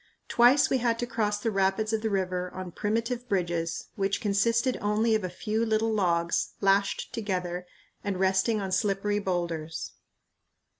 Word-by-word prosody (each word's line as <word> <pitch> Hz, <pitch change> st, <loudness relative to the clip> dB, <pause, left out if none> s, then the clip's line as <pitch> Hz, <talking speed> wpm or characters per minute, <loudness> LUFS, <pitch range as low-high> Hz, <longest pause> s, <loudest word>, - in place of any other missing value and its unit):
Twice 245 Hz, +4 st, +5 dB
we 265 Hz, -, +1 dB
had 230 Hz, -1 st, +1 dB
to 240 Hz, -, -2 dB
cross 215 Hz, -3 st, -1 dB
the 225 Hz, +2 st, -1 dB
rapids 195 Hz, +2 st, +1 dB
of 220 Hz, -, +1 dB
the 220 Hz, -, 0 dB
river 185 Hz, -2 st, -1 dB
on 185 Hz, -1 st, -6 dB
primitive 230 Hz, +5 st, -2 dB
bridges 170 Hz, -3 st, -1 dB
which 195 Hz, -1 st, 0 dB
consisted 230 Hz, +5 st, +2 dB
only 215 Hz, +2 st, +2 dB
of 215 Hz, -2 st, +1 dB
a 185 Hz, -, -2 dB
few 215 Hz, +5 st, -2 dB
little 220 Hz, 0 st, +1 dB
logs 170 Hz, -4 st, +1 dB
lashed 195 Hz, 0 st, +1 dB
together 180 Hz, -4 st, -3 dB, 0.4 s
and 195 Hz, -3 st, -2 dB
resting 190 Hz, +4 st, +2 dB
on 195 Hz, -2 st, -3 dB
slippery 200 Hz, +2 st, +1 dB
boulders. 170 Hz, -4 st, -3 dB
205 Hz, 155 wpm, -28 LUFS, 185-225 Hz, 0.4 s, Twice